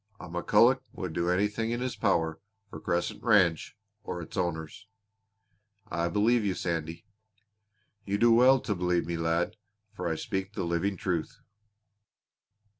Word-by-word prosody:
A - - -8
McCulloch 105 +9 +3
would 90 -4 -5
do 85 +1 0
anything 105 +5 0
in 120 +1 -1
his 125 0 -3
power 80 -6 0 0.3
for - - -7
Crescent 85 0 -2
Ranch 100 -3 +2 0.3
or 90 - -5
its 85 - -9
owners." 85 +2 -3 1.0
"I 85 +1 0
believe 110 +6 +2
you, 95 -3 0
Sandy." 85 +2 -3 1.0
"You 100 0 -1
do 115 +2 +5
well 130 +3 +6
to 105 - -1
believe 90 -2 0
me, 85 - -3
lad, 80 +1 0 0.4
for 90 - -4
I 80 - 0
speak 95 +4 -4
the 100 - -3
living 85 +3 -1
truth!" 85 -4 -2
90 Hz, 145 wpm, -29 LUFS, 85-105 Hz, 1.0 s, well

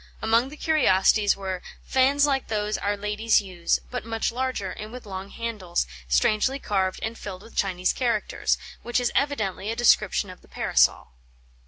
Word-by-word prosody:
Among 230 +4 +2
the 300 - -11
curiosities 210 -10 +3
were 190 -2 -4 0.2
"fans 275 +2 +3
like 275 -2 0
those 210 -1 -1
our 205 0 -1
ladies 210 +2 +2
use, 180 -4 -1
but 250 - -3
much 225 0 -1
larger, 245 -6 -2
and 215 +1 -8
with 250 -1 -9
long 195 -1 -6
handles, 210 -7 -2 0.2
strangely 215 - +2
carved 190 -7 -1
and 220 +1 -3
filled 195 -3 -8
with 225 - -15
Chinese 185 -2 +1
characters," 235 -4 0 0.2
which 240 +1 0
is 245 - 0
evidently 215 -9 -1
a 225 - -1
description 210 -4 +3
of 180 - -14
the - - -21
Parasol. - - +2
215 Hz, 165 wpm, -25 LUFS, 195-245 Hz, 0.2 s, curiosities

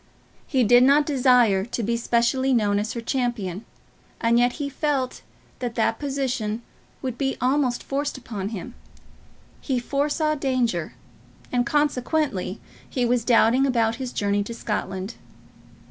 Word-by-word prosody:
He 260 -4 +2
did 245 +2 +6
not 280 +3 +5
desire 250 -8 +4
to 235 +2 -4
be 235 +3 0
specially 240 +3 +1
known 205 -3 +2
as 215 +2 -3
her 235 - -4
champion, 230 -6 -2 0.5
and 235 0 +3
yet 245 0 +3
he 290 -2 -3
felt 275 -2 -1 0.4
that 240 -2 -4
that 225 -1 +1
position 255 -6 -2 0.4
would 255 -2 -4
be 270 -1 -1
almost 255 -1 +1
forced 280 0 -2
upon 210 -6 -5
him. 225 +3 -7 0.9
He 265 -3 -1
foresaw 295 +4 0
danger, 250 - -1 0.6
and 245 -1 +1
consequently 290 - 0 0.3
he 250 -2 0
was 240 -1 +1
doubting 240 +3 +4
about 230 -3 +1
his 255 -2 -4
journey 205 -2 0
to 235 - -6
Scotland. 195 -1 -4
245 Hz, 140 wpm, -24 LUFS, 225-270 Hz, 0.9 s, did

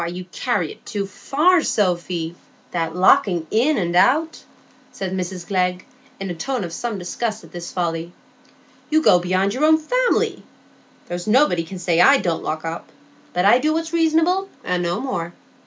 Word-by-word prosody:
"You 180 +1 -6
carry 205 - -1
it - - -14
too 200 -1 -3
far, 310 - +2
Sophy,—that 175 - -3
locking 180 -2 +3
in 265 +8 +2
and 175 -3 -1
out," 310 - +2 0.5
said 190 -1 -5
Mrs 185 -1 -4
Glegg, 180 -1 -1 0.3
in 195 -2 -4
a - - -2
tone 245 +8 -3
of 170 -2 -6
some 230 +2 -3
disgust 215 +4 -4
at - - -15
this 175 -1 -7
folly. 170 -1 -2 0.8
"You 315 +1 +3
go 180 - +6
beyond 185 +3 0
your 260 +5 -2
own 315 0 +6
family. - - 0 0.7
There's 175 +1 -5
nobody 220 - +3
can 185 +3 -8
say 175 -1 +2
I 275 +9 +7
don't 170 -9 -1
lock 155 +1 -4
up; 165 +1 -5 0.4
but 180 +1 +1
I 235 +5 +6
do 305 +4 +1
what's 325 +1 -3
reasonable, 335 +4 +2
and 180 -1 -1
no 175 +2 -1
more. 175 -10 -4
190 Hz, 170 wpm, -21 LUFS, 175-270 Hz, 0.8 s, I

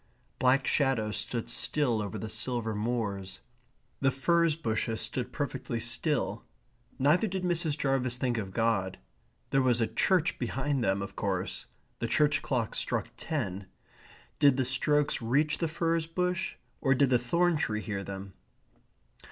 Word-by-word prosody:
Black 130 +1 +4
shadows 120 -7 +1
stood 115 +2 -3
still 120 -1 +1
over 105 +1 -4
the 110 - -5
silver 110 +1 -2
moors. 105 -3 -3 0.6
The 135 - +3
furze 165 +4 +2
bushes 115 -6 -1
stood 125 -3 -2
perfectly 130 -5 -3
still. 120 +6 0 0.5
Neither 150 - +3
did 190 -1 -3
Mrs. 170 -4 +1
Jarvis 135 -4 +1
think 125 -2 0
of 95 -3 -5
God. 110 -4 0 0.5
There 135 - +4
was 125 -2 +3
a 115 - +3
church 175 +6 +1
behind 135 +2 -1
them, 95 -1 +1
of 100 - -8
course. 95 -2 -2 0.3
The - - -1
church 150 -1 +3
clock 130 -7 -1
struck - - -1
ten. 100 - -3 0.7
Did 140 -2 +5
the 130 - +1
strokes 145 +3 +2
reach 140 +7 +1
the 165 - +1
furze 165 0 0
bush, 180 +1 -1 0.3
or 135 -1 +3
did 130 0 +3
the 125 - +5
thorn 170 +8 +2
tree 110 -8 -1
hear 100 -2 -4
them? 95 0 -7
130 Hz, 150 wpm, -30 LUFS, 110-150 Hz, 0.7 s, Did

